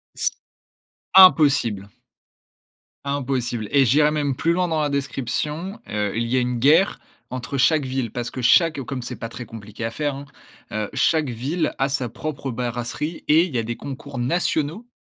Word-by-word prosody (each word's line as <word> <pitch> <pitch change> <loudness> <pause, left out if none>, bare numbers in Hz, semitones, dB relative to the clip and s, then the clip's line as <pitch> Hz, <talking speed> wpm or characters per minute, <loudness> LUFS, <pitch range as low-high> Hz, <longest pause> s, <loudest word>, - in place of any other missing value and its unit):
S - - +1 0.8
Impossible! 140 - +6 1.2
impossible 130 -5 -2
et 140 -1 +5
j'irai 150 +5 +4
même 145 -3 -1
plus 165 +6 +1
loin 180 +1 +1
dans 160 -2 0
la 150 - 0
description, 140 - -3
heu, 105 -1 -2
il 115 +1 -1
y 125 +2 +1
a - - +4
une 125 -1 -1
guerre 160 - +4 0.3
entre 130 +2 -4
chaque 145 +1 +3
ville. 130 -3 -2
Parce 120 0 -4
que 130 - -5
chaque 155 +5 +4
comme 130 0 -5
c'est 120 - -6
pas 115 - -6
très 120 +1 -8
compliqué 110 0 -8
à 115 - -2
faire, 145 +2 -2
hein, 140 +1 -8 0.5
heu, 105 -1 -2
chaque 155 -4 +2
ville 145 +8 -2
a 135 +1 +2
sa 130 -3 -2
propre 135 +3 -5
brasserie 120 +6 -4
et 155 +3 +6
il 165 -8 -7
y - - +2
a - - -1
des 120 +1 -4
concours 140 -1 -8
nationaux 160 - -1
135 Hz, 180 wpm, -22 LUFS, 120-150 Hz, 1.2 s, Impossible